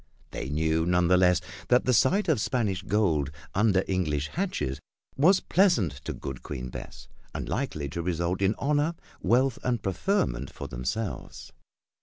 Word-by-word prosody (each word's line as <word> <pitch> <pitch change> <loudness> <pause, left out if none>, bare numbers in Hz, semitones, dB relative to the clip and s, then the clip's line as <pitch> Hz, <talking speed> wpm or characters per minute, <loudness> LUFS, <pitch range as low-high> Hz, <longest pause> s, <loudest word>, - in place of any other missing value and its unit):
They 65 - -5
knew, 80 +2 +1
none 90 -1 +3
the 90 - +6
less, 90 -1 +4 0.3
that 125 0 +4
the 125 - +3
sight 190 - +3
of 150 -10 +2
Spanish 105 -8 0
gold 95 -9 +1 0.2
under 100 -2 +3
English 75 -6 -1
hatches 75 - -2 0.4
was 185 +7 +5
pleasant 175 - +3
to - - -2
good 65 -2 -6
Queen 65 -3 -6
Bess, - - -9 0.3
and - - -4
likely 100 - -2
to 85 +5 -4
result 85 +2 -1
in 100 +2 +2
honor, 150 +3 +1 0.3
wealth 125 +1 +2
and 120 -4 -1
preferment 90 - 0
for - - -7
themselves. 65 - -5
95 Hz, 155 wpm, -27 LUFS, 80-125 Hz, 0.4 s, the